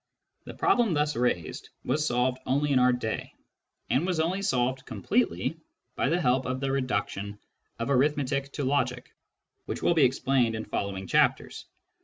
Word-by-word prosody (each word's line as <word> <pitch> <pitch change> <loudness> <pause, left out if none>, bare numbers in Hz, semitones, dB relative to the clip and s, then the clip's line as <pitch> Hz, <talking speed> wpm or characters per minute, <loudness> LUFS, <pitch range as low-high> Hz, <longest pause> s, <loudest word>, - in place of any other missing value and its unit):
The - - -9
problem 230 -8 +2
thus 150 0 +1
raised 120 -9 -1 0.2
was 150 0 +1
solved 125 +1 +1
only 140 +3 +1
in 130 - +4
our 125 - +5
own 125 -1 +3
day, 110 -3 -4 0.5
and 135 - +2
was 180 -2 -1
only 175 +5 0
solved 130 -8 0
completely 210 -7 -1 0.4
by - - +1
the 170 - +2
help 130 -4 +1
of 130 0 -2
the 135 0 -1
reduction 105 -6 -2 0.4
of 115 +4 -2
arithmetic 140 0 +1
to 145 - -3
logic 130 -2 -1 0.5
which - - -4
will - - +4
be 160 -4 +4
explained 130 -2 +1
in 110 - -4
following 100 -2 -3
chapters. - - +1
130 Hz, 165 wpm, -28 LUFS, 125-150 Hz, 0.5 s, our